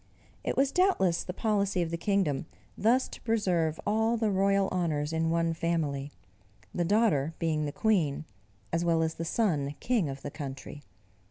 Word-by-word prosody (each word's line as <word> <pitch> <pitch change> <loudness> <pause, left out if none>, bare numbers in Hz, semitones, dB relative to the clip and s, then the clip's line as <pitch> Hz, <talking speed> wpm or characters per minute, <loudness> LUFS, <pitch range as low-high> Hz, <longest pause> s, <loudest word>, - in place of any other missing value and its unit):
It - - -2
was 270 0 +3
doubtless 360 - +2
the - - -5
policy 200 -3 0
of 165 - -4
the - - -1
kingdom 170 -5 0 0.3
thus 245 +5 +2
to - - -10
preserve 180 -8 0
all 220 +3 +2
the 220 -2 +1
royal 195 0 +2
honors 160 -4 -1
in 160 0 +1
one 165 0 +1
family 155 -4 -1 0.6
the 175 - 0
daughter 170 -6 +2
being 155 -2 0
the 145 - -3
queen, 160 -8 +1 0.5
as 170 +1 +1
well 165 -1 +2
as 160 0 -1
the 165 - -5
son 155 -8 0
king 225 - +1
of 135 0 -7
the 145 - -5
country. 140 0 -7
170 Hz, 170 wpm, -29 LUFS, 155-205 Hz, 0.6 s, was